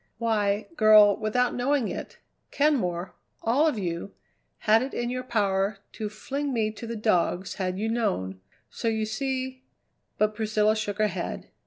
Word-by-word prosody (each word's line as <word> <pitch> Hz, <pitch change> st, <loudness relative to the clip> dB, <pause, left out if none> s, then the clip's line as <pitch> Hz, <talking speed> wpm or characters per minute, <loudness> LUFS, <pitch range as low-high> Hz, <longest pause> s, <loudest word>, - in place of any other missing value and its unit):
Why, 215 Hz, -2 st, 0 dB
girl, 215 Hz, -2 st, +7 dB
without 240 Hz, +3 st, 0 dB
knowing 255 Hz, -1 st, +1 dB
it, -, -, -6 dB, 0.3 s
Kenmore 195 Hz, -, 0 dB, 0.3 s
all 265 Hz, +8 st, +3 dB
of 300 Hz, -, 0 dB
you 175 Hz, 0 st, -4 dB, 0.5 s
had 220 Hz, +1 st, +5 dB
it 265 Hz, +2 st, -4 dB
in 240 Hz, 0 st, -1 dB
your 255 Hz, 0 st, -2 dB
power 200 Hz, -4 st, 0 dB
to 215 Hz, -2 st, -4 dB
fling 275 Hz, +7 st, -4 dB
me 220 Hz, -3 st, 0 dB
to 225 Hz, +2 st, -8 dB
the 230 Hz, -, -4 dB
dogs 190 Hz, -3 st, +1 dB
had 185 Hz, 0 st, -1 dB
you 215 Hz, +3 st, -1 dB
known, 190 Hz, -, -1 dB, 0.3 s
so 230 Hz, -, -4 dB
you 220 Hz, -1 st, +1 dB
see 260 Hz, +3 st, -3 dB, 0.3 s
" -, -, -49 dB
But 215 Hz, 0 st, +2 dB
Priscilla 215 Hz, 0 st, +2 dB
shook 210 Hz, -2 st, -3 dB
her 215 Hz, -, +3 dB
head. 185 Hz, -4 st, -4 dB
215 Hz, 165 wpm, -27 LUFS, 205-240 Hz, 0.5 s, girl